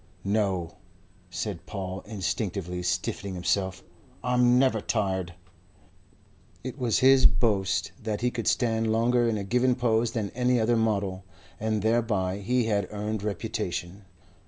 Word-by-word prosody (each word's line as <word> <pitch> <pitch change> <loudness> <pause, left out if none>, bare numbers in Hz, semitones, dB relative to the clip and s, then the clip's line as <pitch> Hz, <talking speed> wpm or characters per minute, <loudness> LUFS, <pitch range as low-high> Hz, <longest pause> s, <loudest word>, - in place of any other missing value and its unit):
"No," 95 -5 0 0.5
said 90 -5 -5
Paul, 95 -1 -5
instinctively 90 -2 -3
stiffening 90 +2 -2
himself. 95 +1 -1 0.4
"I'm 125 0 +4
never 130 -4 +3
tired." 95 -6 -1 1.3
It 130 +2 -6
was 120 -4 +2
his 135 0 +7
boast 100 -1 +1
that 110 -1 -3
he 125 0 +1
could 115 -2 -4
stand 115 -2 +1
longer 120 +1 +3
in 110 - 0
a 100 - -3
given 125 +5 +2
pose 120 -2 +1
than 105 -4 -2
any 125 0 +2
other 115 +2 +2
model, 100 -4 0 0.4
and 110 -1 -1
thereby 110 -5 +1
he 120 +5 +1
had 100 -4 0
earned 105 0 -3
reputation. 100 -1 -4
105 Hz, 135 wpm, -27 LUFS, 95-120 Hz, 1.3 s, his